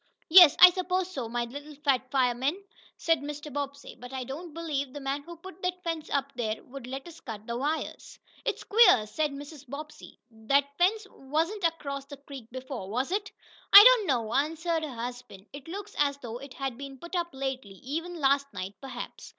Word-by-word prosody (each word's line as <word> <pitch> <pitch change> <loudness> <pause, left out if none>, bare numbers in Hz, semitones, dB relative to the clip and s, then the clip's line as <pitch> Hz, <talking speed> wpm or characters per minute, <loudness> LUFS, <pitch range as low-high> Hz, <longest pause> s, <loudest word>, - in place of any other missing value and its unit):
"Yes, 345 -3 +10
I 360 - +11
suppose 370 0 -1
so, 255 -10 -4
my 240 +1 -1
little 285 +5 -9
fat 270 -3 0
fireman," 260 +5 +1 0.4
said 330 -2 +2
Mr. 295 0 -7
Bobbsey. 280 0 -5
"But 250 +1 -10
I 260 -1 -4
don't 310 +7 -7
believe 295 -4 -3
the 290 - -6
man 275 +1 -2
who 340 +4 -10
put 375 +1 -12
that 360 0 -3
fence 330 -3 -3
up 280 0 -1
there 220 -3 -3
would 260 -1 -10
let 270 +4 -6
us 335 -1 -12
cut 215 -3 -8
the 235 - -4
wires." 295 +6 -3 0.3
"It's - - -2
queer," 430 - +6
said 300 +9 -1
Mrs. 285 -1 -10
Bobbsey. 300 +3 -9
"That 275 +6 0
fence 410 +4 +2
wasn't 325 +8 -2
across 280 -4 -2
the 285 0 -10
creek 275 -4 -11
before, 255 -5 -7
was 255 - -2
it?" 395 0 -2 0.4
"I 400 - +13
don't - - +7
know," 235 -5 0
answered 325 +4 0
her 310 - -3
husband. 240 -4 -7
"It 285 0 -10
looks 405 +4 -7
as 280 -1 +2
though 240 -3 -7
it 275 0 -11
had 270 -3 -4
been 275 -1 -8
put 340 +7 -8
up 345 -1 0
lately 265 -7 -5
even 330 +6 -4
last 280 0 +2
night, 185 +1 -5
perhaps. 255 -3 -8
280 Hz, 195 wpm, -28 LUFS, 255-330 Hz, 0.4 s, I